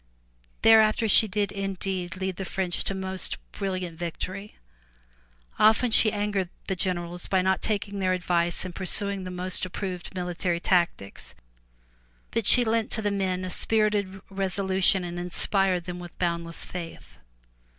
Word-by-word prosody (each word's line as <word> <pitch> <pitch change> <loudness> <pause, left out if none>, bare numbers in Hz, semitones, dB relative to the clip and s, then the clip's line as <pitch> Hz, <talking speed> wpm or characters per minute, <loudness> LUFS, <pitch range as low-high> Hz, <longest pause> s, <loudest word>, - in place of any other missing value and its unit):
'' - - -37
Thereafter 220 0 +5
she 220 +1 +7
did 205 0 -1
indeed 190 -2 -3
lead 190 -1 -3
the 195 - -3
French 185 -1 -1
to 195 - -2
most 190 -1 -4
brilliant 185 -4 -4
victory. 185 +4 -5 1.0
Often 220 +3 +4
she 220 0 +6
angered 205 -3 -1 0.2
the 190 - -2
generals 175 -1 -2
by 190 -2 +2
not 190 0 +1
taking 205 -2 -2
their 185 -1 +1
advice 175 -1 +2
and 185 - -6
pursuing 195 +1 -2
the - - -5
most 180 0 -3
approved 185 0 -5
military 180 -1 -2
tactics, 170 - -1 1.0
but 230 -2 -1
she 245 -1 +7
lent 225 0 +1
to 220 - -1
the 205 - +1
men 185 -2 -1
a 185 - -5
spirited 205 -3 0
resolution 190 -1 +2
and 175 0 -5
inspired 180 +1 0
them 180 0 -6
with 175 -1 -10
boundless 170 -1 -2
faith. 170 -2 -8
190 Hz, 150 wpm, -26 LUFS, 180-200 Hz, 1.0 s, she